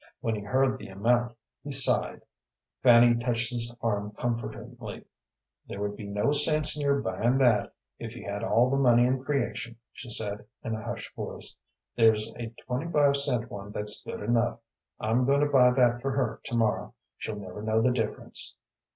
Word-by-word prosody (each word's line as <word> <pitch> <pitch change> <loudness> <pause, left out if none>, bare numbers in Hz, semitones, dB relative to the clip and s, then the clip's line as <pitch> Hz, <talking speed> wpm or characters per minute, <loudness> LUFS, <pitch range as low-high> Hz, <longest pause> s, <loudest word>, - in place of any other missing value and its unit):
When 115 - -1
he 105 - -4
heard 130 +5 +1
the - - -9
amount 120 +5 0 0.3
he 145 - -6
sighed. 135 -1 +2 0.6
Fanny 120 -1 +7
touched 120 0 -1
his 120 -1 -1
arm 105 -2 -1
comfortingly. 120 -1 -5 0.6
"There 100 - -7
would 105 0 -2
be 105 - -8
no 105 +7 0
sense 150 +1 +2
in 150 - -4
your 140 -1 +2
buying 115 +7 0
that, 120 -6 +2 0.2
if - - -7
you - - -9
had 100 0 -4
all 120 +4 +3
the 135 - +2
money 120 -3 +5
in 130 +1 0
creation," 135 -4 -2 0.2
she 120 - -10
said, 105 -2 -3 0.2
in 115 - -3
a 110 - -4
hushed 115 0 -6
voice. - - -7 0.4
"There's 110 -1 +3
a 120 - -4 0.2
twenty 135 +7 -3
five 145 -3 +4
cent 130 -4 0
one 100 -1 -8
that's 105 0 0
good - - -6
enough. 115 +2 +1 0.4
I'm 115 +4 +1
going 140 +1 +3
to - - +4
buy 130 -4 +5
that 120 -1 +3
for 135 - -1
her 125 -5 -1
to 120 - -3
morrow. 115 -2 0 0.2
She'll 110 - -4
never 100 0 -8
know 110 +1 +1
the 125 +3 +3
difference." 115 -4 -3
120 Hz, 185 wpm, -28 LUFS, 110-130 Hz, 0.6 s, Fanny